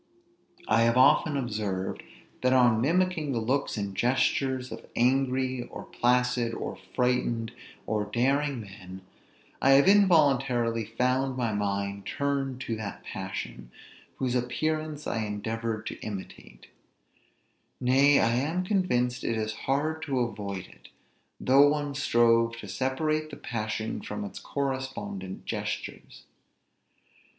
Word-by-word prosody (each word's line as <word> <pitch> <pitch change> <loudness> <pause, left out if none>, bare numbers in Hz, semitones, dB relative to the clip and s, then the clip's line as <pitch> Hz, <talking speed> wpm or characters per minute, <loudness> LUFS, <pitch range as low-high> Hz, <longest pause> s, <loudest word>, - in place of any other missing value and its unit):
I 115 - +4
have 115 +1 +3
often 145 +3 +5
observed, 105 -7 -3 0.4
that 130 0 +3
on 120 -3 +4
mimicking 165 0 +1
the 120 - 0
looks 130 +3 -1
and 100 -2 -3
gestures 130 +2 +1
of - - -8
angry, 130 0 +1
or - - -8
placid, 125 -1 +1
or - - -5 0.2
frighted, 125 -2 +1 0.3
or 105 -1 -1
daring 135 +2 0
men, 95 -2 -10 0.6
I 135 - +6
have 140 +5 +6
involuntarily 135 - +4
found 125 +4 0
my 120 -3 0
mind 100 -1 -2
turned 135 -2 -2
to 115 - -2
that 105 -2 -6
passion, 95 -10 -6 0.5
whose 130 -2 -1
appearance 155 +4 -2
I 115 -1 -1
endeavored 110 +1 -3
to - - -6
imitate; 100 -3 -8 1.1
nay, 135 +3 +5
I 115 - +3
am 160 +8 0
convinced 135 - 0
it 115 - -1
is 110 0 -2
hard 150 +7 -1
to 135 -3 +1
avoid 100 -5 -4
it, - - -17 0.5
though 140 +2 +6
one 145 -1 -1
strove 115 -4 +3
to 110 - -8
separate 155 +8 -1
the 145 - -9
passion 110 -1 -3
from 215 - -5
its 200 - -8
correspondent 130 -9 -4
gestures. - - -5
125 Hz, 125 wpm, -28 LUFS, 110-140 Hz, 1.1 s, I